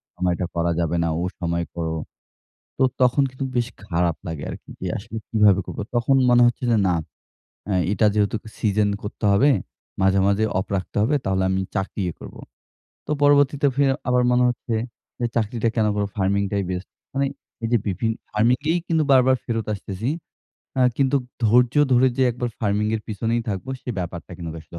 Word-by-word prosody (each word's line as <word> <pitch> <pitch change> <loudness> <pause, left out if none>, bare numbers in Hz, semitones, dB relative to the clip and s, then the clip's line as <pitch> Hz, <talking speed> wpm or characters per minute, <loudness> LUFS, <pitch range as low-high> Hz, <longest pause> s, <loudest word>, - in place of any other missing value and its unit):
সময়টা 90 0 0
করা 85 0 +1
যাবে 85 0 0
না - - +1
ও - - -2 0.2
সময় 85 -1 -1
করো। 80 -1 -2 0.8
তো 130 - +3 0.2
তখন 125 +3 +4
কিন্তু 130 +1 -5
বেশ 120 -1 +1 0.2
খারাপ 85 -2 0
লাগে 80 -3 -5
আরকি, - - -9
যে - - -4
আসলে 110 +2 -7
কিভাবে 105 -3 +4
করব। - - -8 0.2
তখন 125 +3 +3
মনে 120 0 +6
হচ্ছে 120 +1 -2
যে 110 - +4
না 90 - +2 0.8
আ - - +1 0.2
এটা 105 +2 +3
যেহেতু 105 +1 +1 0.2
সিজন 105 -1 +2
করতে 105 +1 -7
হবে, 135 +9 +5 0.5
মাঝে, 95 +1 +3
মাঝে 100 +2 +2
অফ 95 - -2
রাখতে 95 - -6
হবে 130 +8 +2
তাহলে 95 0 +1
আমি 95 0 +1 0.2
চাকরিই 95 -2 -2
করব। - - -10 0.7
তো - - -3
পরবর্তীতে 145 0 +4
ফি 140 - +3 0.2
আবার 125 0 +3
মনে 125 0 +4
হচ্ছে, 120 -1 -3 0.4
যে 120 - 0
চাকরিটা 115 +1 0
কেন 110 -2 +2
করবো 100 -1 -1
ফার্মিং 100 +1 +1
টাই 100 -1 0
বেস্ট। 90 0 -4 0.2
মানে 140 0 +1 0.4
এই - - +1
যে 120 - +5
বিভিন্ন 110 +4 0 0.2
ফার্মিং-এই 125 +10 +2
কিন্তু 160 -2 +2
বারবার 130 0 +5
ফেরত 115 -2 -2
আসতেছি। 100 +5 -4 0.7
আ - - +3 0.2
কিন্তু 140 0 +2 0.3
ধৈর্য 120 +4 +4 0.2
ধরে 125 +1 +5
যে 130 - +2
একবার 120 +1 -3
ফার্মিং 105 0 +1
এর 110 - -1
পেছনেই 115 +2 -1
থাকবো 100 +5 -4
সে - - -10
ব্যাপারটা 85 0 -5
কিন্তু 85 -2 -6
আসলে 85 - -11
105 Hz, 180 wpm, -23 LUFS, 95-125 Hz, 0.8 s, মনে